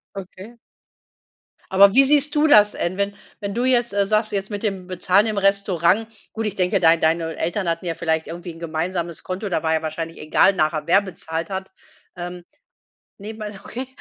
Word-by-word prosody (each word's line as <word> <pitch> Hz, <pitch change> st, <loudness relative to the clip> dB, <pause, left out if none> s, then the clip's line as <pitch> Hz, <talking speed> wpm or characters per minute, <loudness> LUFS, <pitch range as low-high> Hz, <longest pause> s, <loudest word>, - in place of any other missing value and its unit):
Okay. 195 Hz, +4 st, -10 dB, 1.1 s
Aber 195 Hz, +1 st, +6 dB
wie 270 Hz, -, +7 dB
siehst 290 Hz, +1 st, +3 dB
du 300 Hz, +1 st, +4 dB
das 210 Hz, -7 st, +6 dB
en 175 Hz, +2 st, -2 dB
wenn 200 Hz, 0 st, -1 dB, 0.3 s
wenn 200 Hz, -1 st, -4 dB
du 240 Hz, +3 st, -1 dB
jetzt, 240 Hz, -3 st, +2 dB
äh, 200 Hz, 0 st, +2 dB
sagst 215 Hz, +2 st, +1 dB
jetzt 195 Hz, -1 st, -2 dB
mit 205 Hz, -1 st, -5 dB
dem 195 Hz, -4 st, -3 dB
Bezahlen 185 Hz, +3 st, +2 dB
im 215 Hz, -2 st, -2 dB
Restaurant? 195 Hz, 0 st, +2 dB, 0.2 s
Gut, 225 Hz, 0 st, -4 dB
ich 205 Hz, -2 st, -3 dB
denke 185 Hz, +1 st, +1 dB
dein 165 Hz, -1 st, +4 dB
deine 165 Hz, 0 st, +1 dB
Eltern 175 Hz, +2 st, -2 dB
hatten 165 Hz, +2 st, -3 dB
ja 170 Hz, -, -1 dB
vielleicht 160 Hz, -1 st, -1 dB
irgendwie 175 Hz, +1 st, -7 dB
'n 165 Hz, -, -14 dB
gemeinsames 170 Hz, +1 st, -3 dB
Konto. 190 Hz, +3 st, -4 dB
Da 170 Hz, -3 st, -1 dB
war 160 Hz, 0 st, +1 dB
ja 160 Hz, -, +1 dB
wahrscheinlich 165 Hz, +1 st, -5 dB
egal 155 Hz, +5 st, +3 dB
nachher 155 Hz, -3 st, 0 dB
wer 190 Hz, +4 st, +5 dB
bezahlt 165 Hz, -3 st, -6 dB
hat, 190 Hz, 0 st, -5 dB, 0.4 s
ähm. 175 Hz, 0 st, -7 dB, 0.8 s
Nebenbei 215 Hz, +1 st, -7 dB
okay, 255 Hz, +3 st, -6 dB
190 Hz, 190 wpm, -22 LUFS, 170-210 Hz, 1.1 s, wie